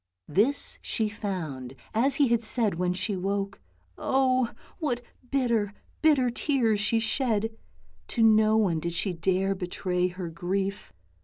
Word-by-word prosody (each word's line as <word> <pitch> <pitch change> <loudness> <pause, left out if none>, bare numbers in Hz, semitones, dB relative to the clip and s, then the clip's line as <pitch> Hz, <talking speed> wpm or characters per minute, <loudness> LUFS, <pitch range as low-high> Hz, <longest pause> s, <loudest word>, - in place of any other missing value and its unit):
This 215 - +2
she 220 - 0
found, 160 - -5 0.2
as 255 +5 +3
he 275 -3 +3
had 235 -1 +3
said, 225 -2 +1
when 180 0 +1
she 195 +3 -2
woke. 195 +1 -2 0.4
Oh! 255 -2 +2 0.3
what 245 -7 -1 0.3
bitter, 235 -7 +1 0.3
bitter 285 -6 +4
tears 235 -5 +1
she 210 +3 +2
shed. 225 -1 0 0.6
To 230 - +1
no 220 0 +5
one 185 -7 +2
did 170 +1 -3
she 180 +2 -1
dare 190 +3 +1
betray 180 -1 -1
her 180 -1 -5
grief. 190 - -2
210 Hz, 140 wpm, -27 LUFS, 185-235 Hz, 0.6 s, no